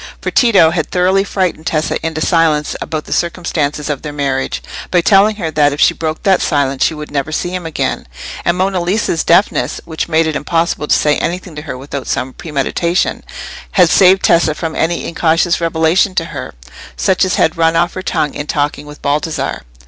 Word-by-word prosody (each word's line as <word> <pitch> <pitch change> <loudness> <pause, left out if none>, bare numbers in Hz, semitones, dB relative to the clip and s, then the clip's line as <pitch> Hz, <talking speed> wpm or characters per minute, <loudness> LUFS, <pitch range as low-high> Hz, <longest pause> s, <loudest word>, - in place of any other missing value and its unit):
For - - -3
Tito 200 -10 +5
had 160 -2 -2
thoroughly 185 +2 +2
frightened 185 -5 -2
Tessa 155 0 -1
into 160 -1 -3
silence 160 -4 +1
about 155 -1 -4
the - - -4
circumstances 160 -4 -1
of 145 -3 -3
their 150 - -6
marriage, 135 -2 -2 0.3
by 180 - +3
telling 200 +4 +4
her 170 -6 -3
that 145 -2 +2
if 145 - -6
she - - +5
broke 155 -1 -4
that 190 -2 +3
silence 140 -3 0
she 160 - +1
would 150 0 -8
never 145 +1 -2
see 175 - -2
him 180 -2 -4
again; 160 - -3 0.4
and 170 +1 +1
Monna 190 -1 0
Lisa's 175 -2 0
deafness, 170 -6 +2
which 160 -1 -4
made 160 0 +3
it 160 -1 -2
impossible 165 -1 -1
to - - +4
say 150 -1 +2
anything 175 -1 -4
to 150 - -6
her 145 -4 -6
without 135 0 -6
some 130 0 -2
premeditation, 170 +4 -1 0.5
had 180 -3 +5
saved 190 0 +5
Tessa 165 -2 +3
from 160 0 -4
any 170 +1 -1
incautious 170 +1 +1
revelation 165 +4 +2
to 165 - 0
her, 130 - -7 0.4
such 190 0 +2
as 185 - +1
had 160 - +2
run 165 0 +2
off 175 +1 +1
her 185 - -5
tongue 160 -5 -1
in 145 - -5
talking 145 0 -2
with 150 0 -12
Baldassarre. 150 +3 -1
160 Hz, 195 wpm, -15 LUFS, 150-175 Hz, 0.5 s, Tito